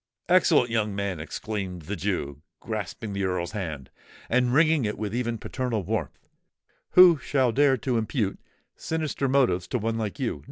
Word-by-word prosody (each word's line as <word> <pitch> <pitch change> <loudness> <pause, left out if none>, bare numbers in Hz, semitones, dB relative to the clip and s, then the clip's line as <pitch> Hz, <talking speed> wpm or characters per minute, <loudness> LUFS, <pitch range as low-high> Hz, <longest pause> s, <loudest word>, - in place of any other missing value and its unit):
"Excellent 165 -9 +4
young 105 -3 0
man!" 100 -4 -2
exclaimed 90 +1 -5
the 100 +7 -4
Jew, 80 -7 -3 0.2
grasping 110 -1 -5
the 100 0 -2
Earl's 90 -2 -1
hand, 80 -11 -5 0.4
and 125 +1 +3
wringing 155 +1 +4
it 105 -1 -2
with 105 -1 -4
even 120 -1 -1
paternal 115 -2 -3
warmth: 95 -5 -4 0.7
"who 180 -4 +8
shall 130 -1 +1
dare 135 +1 +3
to 125 -1 0
impute 110 -2 -2 0.4
sinister 155 -4 -2
motives 125 -10 +2
to 125 - -1
one 115 0 -2
like 110 +5 -4
you? 130 -4 -2
110 Hz, 160 wpm, -26 LUFS, 100-130 Hz, 0.7 s, who